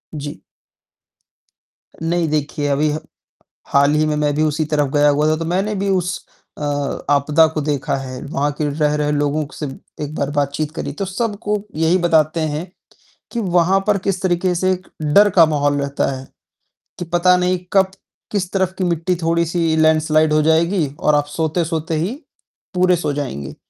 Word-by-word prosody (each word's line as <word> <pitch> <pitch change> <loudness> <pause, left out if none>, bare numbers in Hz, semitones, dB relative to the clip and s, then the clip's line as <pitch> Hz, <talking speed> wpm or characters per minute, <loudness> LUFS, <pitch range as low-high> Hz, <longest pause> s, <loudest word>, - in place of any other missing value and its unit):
जी। 145 0 -7 1.6
नहीं 165 +1 0
देखिए 150 -1 -1
अभी 145 +2 +1
ह 150 - -2 0.7
हाल 140 +1 +3
ही 155 0 +2
में 155 -1 0
मैं 150 -1 +1
भी 155 - +1
उसी 155 +1 +1
तरफ 145 -2 +1
गया 145 0 +4
हुआ 145 +1 +3
था, 155 - +3
तो 165 +1 -4
मैंने 190 +5 0
भी 200 0 -2
उस 180 -2 -1 0.3
अ, - - -6 0.5
आपदा 145 +3 +4
को 155 -1 -3
देखा 145 -3 -1
है, 130 -1 -6
वहाँ 145 0 -1
के 150 - 0
रह 150 0 +1
रहे 150 0 0
लोगों 145 +1 0
से 150 - -5 0.4
एक 145 - -5
बार 140 - -1
बातचीत 145 +1 -1
करी। 140 - -4
तो 195 - -3
सबको 210 +1 -2 0.2
यही 165 +3 +3
बताते 165 -2 +2
हैं, 155 +1 -2 0.7
कि 235 - -2
वहाँ 180 -1 +2
पर 210 -1 +3
किस 195 -2 -1
तरीके 180 0 +1
से 185 +2 +1 0.3
डर 200 +8 +5
का 175 -3 +6
माहौल 145 -2 +1
रहता 140 0 -1
है, 130 +1 -9 0.7
कि 175 - -3
पता 175 +2 +3
नहीं 180 0 +1 0.2
कब 190 -1 +4 0.4
किस 190 -4 -2
तरफ 190 -2 0
की 190 - -1
मिट्टी 175 +1 0
थोड़ी 170 +1 +2
सी 165 -1 0
लैंडस्लाइड 155 0 +3
हो 155 - +4
जाएगी 160 +2 +2
और 150 - +3
आप 145 0 +2
सोते-सोते 160 +1 -1
ही, 175 +9 -1 0.6
पूरे 180 0 +3
सो 155 -3 -2
जाएँगे। 70 - -5
155 Hz, 175 wpm, -19 LUFS, 150-180 Hz, 1.6 s, का